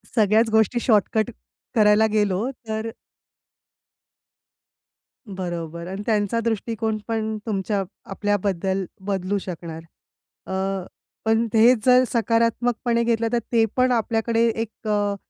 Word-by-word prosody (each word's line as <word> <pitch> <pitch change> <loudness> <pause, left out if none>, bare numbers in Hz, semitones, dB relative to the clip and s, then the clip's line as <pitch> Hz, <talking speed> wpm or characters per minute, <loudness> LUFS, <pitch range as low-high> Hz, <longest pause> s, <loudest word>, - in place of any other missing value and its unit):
सगळ्याच 220 +1 +4
गोष्टी 220 +2 +2
शॉर्टकट 215 -1 +2 0.4
करायला 210 0 +5
गेलो 210 +2 +1 0.2
तर 220 +1 -3 2.4
बरोबर. 175 -3 -5
अन् 195 +2 -5
त्यांचा 215 0 +1
दृष्टिकोन 225 -1 -1
पण 220 -1 -2
तुमच्या 200 -1 -1 0.3
आपल्याबद्दल 195 -2 -1 0.2
बदलू 195 0 -1
शकणार. 170 -3 -6 0.7
अ, - - -4 0.7
पण 225 +1 +2
त - - -1
हेच 225 0 +5
जर 250 0 +6
सकारात्मकपणे 235 +1 +1
घेतलं 230 -1 +1
तर 240 - +3
ते 230 -2 +4
पण 255 0 +3
आपल्याकडे 230 0 +1
एक 225 0 -5
अ, 205 -1 +1
220 Hz, 110 wpm, -23 LUFS, 200-230 Hz, 2.4 s, जर